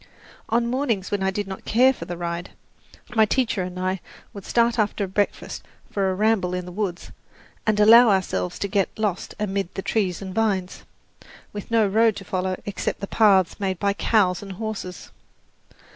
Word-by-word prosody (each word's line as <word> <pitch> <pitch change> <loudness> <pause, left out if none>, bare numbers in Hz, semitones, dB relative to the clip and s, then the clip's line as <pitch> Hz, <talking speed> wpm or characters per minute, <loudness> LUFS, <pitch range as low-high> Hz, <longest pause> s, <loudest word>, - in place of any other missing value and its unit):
On 235 +1 +2
mornings 235 -6 -1
when 205 -1 -1
I 190 - +2
did 200 +1 -3
not 190 -1 -7
care 255 +4 +4
for 170 - -8
the 175 0 -6
ride, 170 0 -4 0.7
my 220 - +6
teacher 225 -2 +1
and 180 0 -5
I 185 0 -1 0.3
would 200 -2 -9
start 235 0 +2
after 205 -1 0
breakfast 195 +2 -2 0.3
for 195 -2 0
a 185 - -1
ramble 200 -3 +1
in 180 -1 -4
the 180 - -8
woods, 185 -2 -4 0.6
and 215 -1 +2
allow 230 +3 +8
ourselves 180 - 0
to 200 - -2
get 195 -1 +1
lost 210 -4 -2
amid 195 -3 -2
the 195 - -4
trees 190 -6 0
and 190 -2 -7
vines, 195 -4 -1 0.7
with 205 -1 -7
no 225 -2 +3
road 220 +2 +3
to 195 - -8
follow 185 0 -2
except 205 - -3
the 200 - -3
paths 195 -4 +3
made 190 -2 -1
by 200 +3 +1
cows 195 -4 +2
and 195 -1 -7
horses. 205 -3 -6
200 Hz, 180 wpm, -23 LUFS, 185-220 Hz, 0.7 s, allow